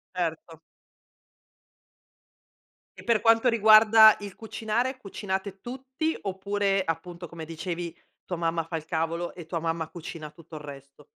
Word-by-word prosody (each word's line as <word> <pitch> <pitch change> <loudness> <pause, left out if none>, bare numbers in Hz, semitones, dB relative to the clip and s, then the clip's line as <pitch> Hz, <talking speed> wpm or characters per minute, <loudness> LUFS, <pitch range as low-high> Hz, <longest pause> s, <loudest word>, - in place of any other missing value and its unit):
Erto. 165 -2 -3 2.4
E - - -11
per 230 -3 +3
quanto 230 +2 +4
riguarda 220 -1 +7
il 200 -2 -8
cucinare, 230 +4 -2
cucinate 195 -3 -5
tutti 265 +5 -3
oppure, 195 0 0
appunto 170 +1 -5
come 165 -1 -8
dicevi, 170 +1 -5 0.3
tua 180 - -3
mamma 165 0 -1
fa 165 - -5
il 155 -1 -4
cavolo 165 +1 -2
e 170 -3 -10
tua 165 0 -3
mamma 165 0 -2
cucina 160 -2 -8
tutto 160 0 -14
il 150 - -7
resto? 140 0 -12
180 Hz, 135 wpm, -27 LUFS, 165-215 Hz, 2.4 s, riguarda